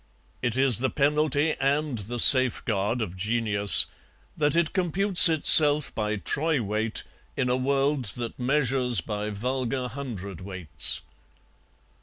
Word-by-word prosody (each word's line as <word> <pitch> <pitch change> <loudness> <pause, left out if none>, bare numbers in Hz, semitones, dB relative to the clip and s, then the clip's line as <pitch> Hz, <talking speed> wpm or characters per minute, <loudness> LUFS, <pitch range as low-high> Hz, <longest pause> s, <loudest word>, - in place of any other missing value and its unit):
It 120 -1 -3
is 130 -5 +5
the 130 +1 -2
penalty 150 +1 -1
and 140 +1 -2
the 115 +4 -7
safeguard 115 -3 +3
of 90 -3 -9
genius 105 0 +3 0.5
that 150 -1 +1
it 170 -2 -1
computes 185 0 +2
itself 150 -2 +5
by 105 -1 -4
troy 150 +8 -2
weight 110 0 -3 0.3
in 125 - -2
a 125 - 0
world 135 +1 -2
that 120 0 -8
measures 125 -3 0
by 105 +4 -6
vulgar 125 +4 -5
hundredweights. 95 - -5
125 Hz, 120 wpm, -24 LUFS, 105-145 Hz, 0.5 s, is